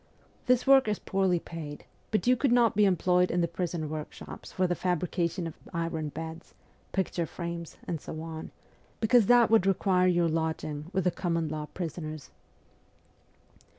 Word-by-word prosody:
This 250 -1 +3
work 270 -3 +6
is 210 -1 +1
poorly 190 -2 +1
paid; 155 -3 -8 0.2
but 215 - 0
you 250 +1 +5
could 255 +1 +1
not 240 -3 +4
be 210 0 +5
employed 180 -1 +3
in 175 - +1
the 170 - +2
prison 170 -2 -3
workshops 155 0 -7
for 185 - +1
the 175 - +1
fabrication 175 0 -1
of 165 - -5 0.2
iron 165 -2 -2
beds, 160 +2 -8 0.4
picture 180 -3 -1
frames, 170 -1 -6
and 165 -3 -3
so 155 - -7
on, 160 0 -6 0.5
because 225 -1 +4
that 240 -2 +6
would 220 -4 +5
require 185 -1 +3
your 175 -1 +3
lodging 160 -1 -2
with 190 -1 0
the 180 - +2
common 165 -3 -1
law 155 0 -4
prisoners.' 155 -3 -5
175 Hz, 160 wpm, -29 LUFS, 160-195 Hz, 0.5 s, work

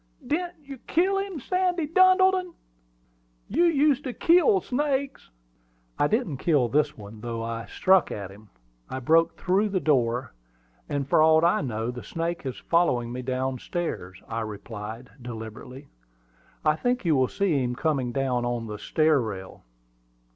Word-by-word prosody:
"Didn't 350 +3 -2
you 275 -2 -9
kill 385 +4 +2
him, 390 -5 -4
Sandy 360 +2 0
Duddleton? 370 +1 +4 0.9
You 330 - +2
used 295 -4 +3
to 255 - -3
kill 360 - +4
snakes." 275 -2 -2 0.7
"I 145 - +4
didn't 210 - -1
kill 140 -5 +2
this 150 +2 +1
one, 105 +1 -11
though 115 -1 -4
I 115 -1 -5
struck 190 - +3
at 100 -2 -6
him. 105 +1 -16 0.4
I 130 - -4
broke 165 +6 +3
through 195 +4 +1
the 195 -2 0
door, 125 -5 +1 0.6
and, 140 -2 -2
for 155 - +4
aught 160 +1 +5
I 170 - +3
know, 115 -3 -3
the 125 0 -8
snake 170 -2 -4
is 130 - -5
following 125 -9 +1
me 125 +1 -4
down 130 0 -2
stairs," 95 - -5
I 115 - -3
replied 110 +2 -7
deliberately. 120 +3 -8 0.8
"I 155 0 +3
think 245 +2 -1
you 160 -3 +3
will 130 -1 +3
see 175 -6 0
him 125 0 -2
coming 135 -4 0
down 125 -1 0
on 120 -1 -2
the 105 -1 -7
stair 155 +5 +2
rail." 95 -5 -7
150 Hz, 155 wpm, -26 LUFS, -, 0.9 s, aught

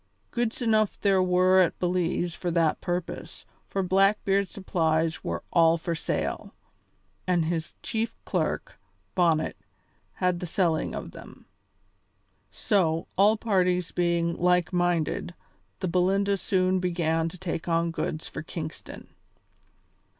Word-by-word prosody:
Goods 240 +1 -1
enough 215 -2 +2
there 195 -2 +3
were 185 +1 +4
at 180 -3 +3
Belize 175 -1 0
for 175 - -3
that 165 -2 +1
purpose, 175 -1 -4 0.2
for 195 - -1
Blackbeard's 195 +1 +2
supplies 160 -4 0
were 85 0 -3
all 165 -1 +5
for 170 +1 -3
sale, 165 - -3 0.7
and 175 -3 +2
his 165 0 -3
chief 225 -3 -2
clerk, - - -2 0.3
Bonnet, 165 -4 +2 0.6
had 180 -2 0
the 180 - -5
selling 165 -2 0
of - - -6
them. - - -13 1.0
So, 165 -6 +1
all 210 +3 +5
parties 180 -5 +1
being 170 -1 +1
like 180 0 +2
minded, 175 -1 0 0.5
the 185 - 0
Belinda 195 +3 +2
soon 185 0 +1
began 165 -2 0
to 185 - -11
take 170 -2 -4
on 165 0 +1
goods 160 -1 -3
for - - -6
Kingston. 155 -1 -7
180 Hz, 125 wpm, -27 LUFS, 165-190 Hz, 1.0 s, all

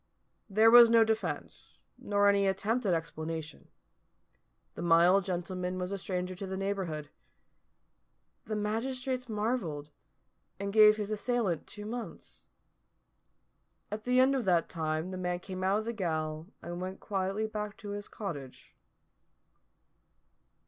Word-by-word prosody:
There 220 +3 +5
was 240 -1 +10
no 230 -1 +6
defence, 220 0 -3 0.2
nor 205 0 +1
any 200 -1 +4
attempt 210 +5 0
at 185 - +3
explanation. 160 -1 -5 1.1
The - - -7
mild 175 +3 +5
gentleman 180 0 -3
was 180 +1 -3
a 200 - -2
stranger 180 0 -3
to 195 - -5
the 190 0 -4
neighbourhood. 185 -7 -3 1.3
The 215 -2 -3
magistrates 250 +4 -2
marvelled, 210 - -2 0.7
and 200 0 -3
gave 215 -1 +7
his 210 0 -3
assailant 215 -6 -1
two 210 0 -8
months. 235 +2 -8 1.4
At 215 +1 -5
the 250 +1 +3
end 260 +2 +5
of 265 -3 0
that 175 -3 +2
time 160 +1 -2
the 185 - -5
man 180 -1 -1
came 185 0 -6
out 205 +4 +1
of 235 - -3
gaol 155 -3 -2 0.2
and 175 +1 -5
went 185 +1 -5
quietly 195 +2 -2
back 210 -1 -5
to 205 - -9
his 205 0 -5
cottage. 145 - -8
195 Hz, 135 wpm, -31 LUFS, 175-215 Hz, 1.4 s, was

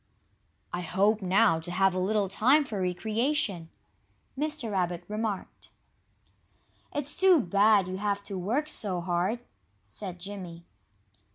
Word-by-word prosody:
"I 175 - -2
hope, 200 +5 +2
now, 190 -1 +3
to 165 +2 -6
have 190 +1 +3
a 185 - -1
little 200 +2 +1
time 265 +10 +4
for 210 -7 -4
recreation," 210 - -1 0.7
Mr. 295 -5 -2
Rabbit 180 -2 -1
remarked. 210 -2 -4 1.2
"It's 290 0 -4
too 370 -3 +5
bad 200 -1 +4
you 185 0 -4
have 200 0 -1
to 200 - -6
work 225 +12 -1
so 195 -11 -1
hard," 180 +6 -1 0.4
said 180 - -6
Jimmy. 175 -3 -8
200 Hz, 125 wpm, -28 LUFS, 180-225 Hz, 1.2 s, too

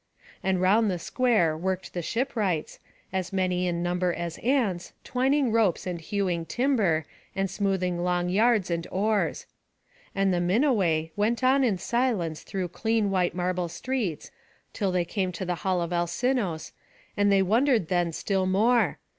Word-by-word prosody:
And 190 -1 0
round 205 +4 +3
the 180 - -1
square 215 -5 +1
worked 185 +3 -3
the 175 - -2
shipwrights, 210 - -2 0.3
as 190 0 -2
many 180 -1 0
in 170 -1 -1
number 180 0 0
as 170 -1 -5
ants, 230 -9 0
twining 265 0 +1
ropes, 220 -6 +2
and 175 -2 -4
hewing 180 -2 -1
timber, 195 - +1 0.3
and 195 0 0
smoothing 185 -3 -1
long 180 0 0
yards 210 0 +2
and 170 0 -2
oars. 210 +2 0 0.7
And 195 -1 +2
the 175 - +1
Minuai 180 - +2
went 220 +4 0
on 265 +2 +4
in 220 -7 +2
silence 190 -6 -1
through 185 -2 -4
clean 220 +2 0
white 180 -2 +1
marble 180 0 -1
streets, 210 - -3 0.4
till 195 -3 -1
they 180 -1 +1
came 185 0 -2
to 180 +2 -4
the 180 - -1
hall 185 -1 0
of 170 +1 -4
Alcinous, 175 0 -1 0.4
and 205 0 +3
they 195 -1 +4
wondered 230 - +2
then 175 -2 +1
still 190 +3 -1
more. 210 -2 +3
190 Hz, 155 wpm, -26 LUFS, 175-220 Hz, 0.7 s, on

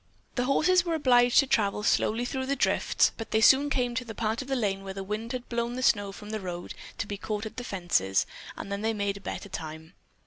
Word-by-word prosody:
The 245 - 0
horses 360 +7 +4
were 340 -2 -1
obliged 245 -5 +4
to - - -2
travel 210 -5 +1
slowly 230 +3 +2
through 260 +1 -3
the 280 - +1
drifts, 275 - +2
but 225 - -6
they 220 - +2
soon 270 +6 +6
came 250 -4 0
to 250 +1 -3
a 225 - -6
part 220 +2 -1
of 265 - -8
the 270 - 0
lane 195 -5 -1
where 195 -1 -6
the 195 - -4
wind 215 +4 -4
had 250 -1 -5
blown 235 0 -2
the 255 - -3
snow 205 -4 +3
from 210 +2 -9
the 215 - -2
road 175 -2 -6 0.2
to - - -2
be 205 0 -5
caught 210 +1 -4
at 220 - -8
the 245 - -4
fences, 175 - +1 0.3
and 200 - -7
then 200 0 -2
they 225 +1 0
made 200 -1 -2
better 200 - -5
time. 160 -2 -7
220 Hz, 245 wpm, -28 LUFS, 200-250 Hz, 0.3 s, soon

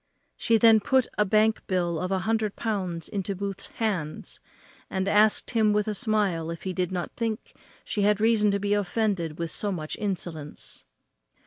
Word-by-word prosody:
She 230 - +2
then 225 0 +6
put 260 +4 +2
a 210 - +5
bank 215 +2 +3
bill 175 -3 0
of 180 - -2
a 190 - +2
hundred 220 -2 0
pounds 185 -7 -3
into 200 0 -3
Mr. - - -11
Booth's 200 -1 -4
hands, 190 -9 -3 0.5
and 190 0 -2
asked 210 +1 +3
him 220 -3 +3
with 210 0 +1
a 215 - 0
smile 205 -7 0
if 170 -1 -6
he 190 - -3
did 180 0 -1
not 180 -2 -3
think 225 -2 -4 0.3
she 210 - -2
had 205 0 +3
reason 220 -1 +3
to 200 0 +1
be 205 +1 0
offended 200 -5 -1
with 170 -1 -3
so 205 - -2
much 155 -4 -4
insolence? 170 - -5
200 Hz, 185 wpm, -26 LUFS, 180-215 Hz, 0.5 s, then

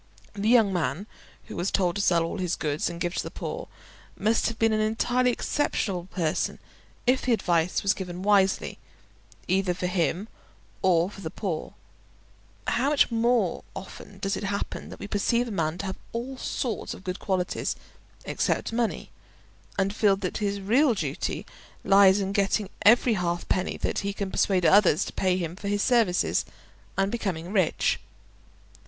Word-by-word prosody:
The 205 +2 -1
young 225 -5 +5
man 165 +2 -1 0.4
who - - -9
was 180 +3 -1
told 180 -3 +1
to 200 - 0
sell 170 -4 +3
all 165 +4 -4
his 180 -1 0
goods 150 -1 -1
and 170 - -7
give 175 0 -1
to - - -1
the - - -6
poor, - - -5 0.5
must 220 +2 +2
have 230 - -3
been 225 -1 +3
an 215 - +1
entirely 245 +3 +2
exceptional 200 -9 -1
person 170 -4 -1 0.5
if 255 +1 +3
the 250 - +2
advice 175 -5 +1
was 200 0 +3
given 180 -1 -6
wisely, 195 -2 +2 0.7
either 185 -1 +1
for 180 - -3
him 180 +2 0 0.5
or 180 0 +3
for 195 - -11
the 160 - -4
poor; 170 -3 -4 0.9
how 265 +4 +1
much 295 -4 +3
more 230 -5 +1
often 195 +1 -9
does 195 0 -1
it - - -4
happen 200 +1 -3
that - - -9
we - - -7
perceive 235 +4 +1
a - - -5
man 165 -4 -1
to 200 - -4
have 190 - -5
all 245 +3 -4
sorts 245 -3 -3
of - - -13
good 185 -1 -4
qualities 185 -3 -1 0.5
except - - -1
money, 230 -1 -1 0.7
and 195 0 +1
feel 205 -2 +4
that 195 -2 -3
his 200 -1 -1
real 240 +6 +3
duty - - -3 0.4
lies 195 0 +6
in 195 -1 -1
getting 200 0 +1
every 235 +2 +6
half 175 -3 -1
penny 185 0 0
that - - -1
he 200 0 -2
can 200 -1 -4
persuade 185 -3 +2
others 190 -4 +5
to - - -7
pay 185 -1 +1
him 170 -2 -3
for 200 - -7
his 205 0 +1
services, 230 -8 +2 0.5
and 195 +1 +1
becoming 185 -7 -3
rich. 185 -6 +2
195 Hz, 170 wpm, -26 LUFS, 180-220 Hz, 0.9 s, lies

